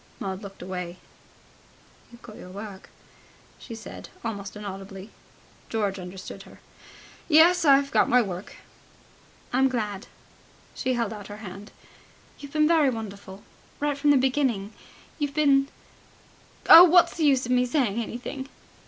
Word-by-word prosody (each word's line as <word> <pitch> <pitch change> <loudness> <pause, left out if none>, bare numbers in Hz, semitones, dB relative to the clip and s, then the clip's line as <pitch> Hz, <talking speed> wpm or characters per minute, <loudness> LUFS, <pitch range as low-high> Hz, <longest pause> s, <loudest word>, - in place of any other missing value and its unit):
Maud 190 0 -5
looked 195 -3 -10
away. 180 -1 -6 1.1
"You've 235 - -16
got 215 - -11
your 180 - -11
work," 200 0 -9 0.7
she 230 - -9
said 225 - -10 0.2
almost 205 -3 -5
inaudibly. 195 -1 -8 0.6
George 205 -3 -2
understood 180 +1 -9
her. - - -15 0.7
"Yes, 335 +3 +5
I've 275 -1 +4
got - - +3
my 250 - +5
work." 190 -4 -4 1.0
"I'm 265 +1 +3
glad." 210 -6 -4 0.7
She 255 - -2
held 230 -3 -2
out 205 -2 -9
her 205 - -9
hand. 195 +3 -10 0.7
"You've 285 -1 -11
been 305 -1 +3
very 315 -4 +4
wonderful... 200 -4 -8 0.4
Right 290 0 0
from 285 +1 0
the 290 - +6
beginning... 255 -6 0 0.5
You've 290 -1 -2
been... 275 -2 +3 1.0
oh, 335 - +11
what's 355 0 +5
the 325 - -1
use 270 -3 +3
of 250 - -4
me 250 0 +2
saying 240 -5 0
anything?" 255 +4 -6
230 Hz, 140 wpm, -25 LUFS, 200-275 Hz, 1.1 s, oh